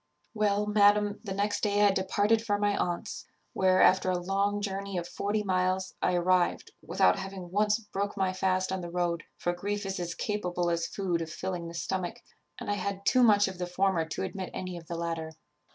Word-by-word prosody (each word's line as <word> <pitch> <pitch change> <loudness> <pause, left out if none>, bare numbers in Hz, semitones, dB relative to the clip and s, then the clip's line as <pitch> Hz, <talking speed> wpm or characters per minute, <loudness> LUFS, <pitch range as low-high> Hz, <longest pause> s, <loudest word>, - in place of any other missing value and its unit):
"Well, 210 -1 +1
madam, 205 0 +4
the 200 - -6
next 205 +1 0
day 205 0 +3
I 200 - +6
departed 205 +3 +1
for 205 -3 +1
my 205 0 +1
aunt's, 180 +4 -3 0.3
where, 185 0 +4
after 185 0 +4
a 180 - +1
long 195 +3 0
journey 200 -1 -3
of 175 0 -3
forty 205 +4 -1
miles, 185 0 0
I 180 - +2
arrived, 175 0 +1
without 90 - +2
having 190 -2 -7
once 210 +2 +3
broke 205 -2 -4
my 190 -1 +1
fast 185 0 0
on 190 -1 -2
the 175 - -6
road; 170 -1 -1
for 175 - -1
grief 205 +3 -3
is 195 -1 -3
as 175 -1 -3
capable 180 -4 -1
as 170 0 0
food 180 -4 -1
of 165 - -4
filling 175 +1 -4
the 170 - -8
stomach, 180 0 -3 0.4
and - - -7
I 205 - +1
had 200 +1 -4
too 255 - +4
much 205 -4 +5
of 190 -2 -7
the 180 - -2
former 180 -1 +1
to 160 - -4
admit 190 0 -4
any 185 -1 -4
of 165 -2 -10
the 170 - -4
latter. 165 -1 -3
190 Hz, 205 wpm, -29 LUFS, 175-205 Hz, 0.4 s, I